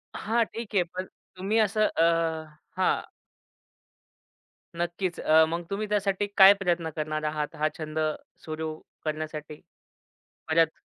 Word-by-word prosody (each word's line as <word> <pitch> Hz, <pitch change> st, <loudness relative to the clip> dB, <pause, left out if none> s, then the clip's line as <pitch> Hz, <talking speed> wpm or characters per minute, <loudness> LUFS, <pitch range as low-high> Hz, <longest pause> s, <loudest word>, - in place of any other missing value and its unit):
हां, 230 Hz, +2 st, +1 dB
ठीक 225 Hz, -1 st, -7 dB
आहे. 185 Hz, -, +5 dB
पण 180 Hz, +2 st, -6 dB, 0.3 s
तुम्ही 195 Hz, +4 st, 0 dB
असं 215 Hz, 0 st, +3 dB
अ 165 Hz, -, +5 dB, 0.7 s
हां. 185 Hz, -, +2 dB, 1.8 s
नक्कीच, 175 Hz, +1 st, -2 dB
अ, 160 Hz, +1 st, +5 dB
मग 170 Hz, +1 st, -2 dB
तुम्ही 210 Hz, +2 st, -2 dB
त्यासाठी 205 Hz, -1 st, +1 dB
काय 195 Hz, 0 st, +10 dB
प्रयत्न 170 Hz, -3 st, 0 dB
करणार 155 Hz, 0 st, -2 dB
आहात 150 Hz, -1 st, -3 dB
हा 155 Hz, -, +1 dB
छंद 155 Hz, 0 st, -4 dB, 0.4 s
सुरू, 155 Hz, 0 st, -4 dB, 0.3 s
करण्यासाठी 155 Hz, -1 st, -4 dB, 0.9 s
परत? 160 Hz, 0 st, +2 dB
170 Hz, 120 wpm, -27 LUFS, 155-195 Hz, 1.8 s, काय